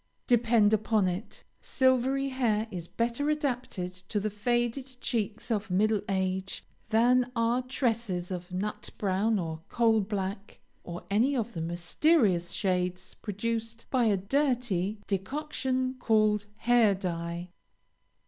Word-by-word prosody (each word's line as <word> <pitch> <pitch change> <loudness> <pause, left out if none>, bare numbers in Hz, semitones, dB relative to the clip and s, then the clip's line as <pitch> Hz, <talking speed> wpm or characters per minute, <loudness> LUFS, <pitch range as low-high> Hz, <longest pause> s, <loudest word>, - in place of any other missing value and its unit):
Depend 230 -3 +4
upon 215 -2 +2
it, 180 +5 -5 0.2
silvery 260 +1 +2
hair 230 -5 +1
is 175 -2 -5
better 240 +8 -1
adapted 250 - -2 0.2
to 210 - 0
the 215 +1 -2
faded 240 +4 -1
cheeks 220 0 -2
of 215 -1 -1
middle 210 +3 +2
age, 190 0 -2 0.2
than 245 +3 +4
are 230 +2 +2
tresses 230 -8 -1
of 180 0 -5
nut 200 +4 -3
brown 205 +3 +1
or 160 -3 -4
coal 225 -2 +3
black, 195 0 -4 0.2
or 175 0 -7
any 245 +8 +3
of 235 -2 -2
the 165 - -4
mysterious 175 - +2
shades 180 -2 -1
produced 230 +2 -4
by 255 -3 +3
a 210 -3 +3
dirty 220 -3 0
decoction 260 +4 -1
called 215 -3 +2
Hair 230 -3 +4
dye. 170 -1 -4
215 Hz, 125 wpm, -29 LUFS, 190-245 Hz, 0.2 s, Depend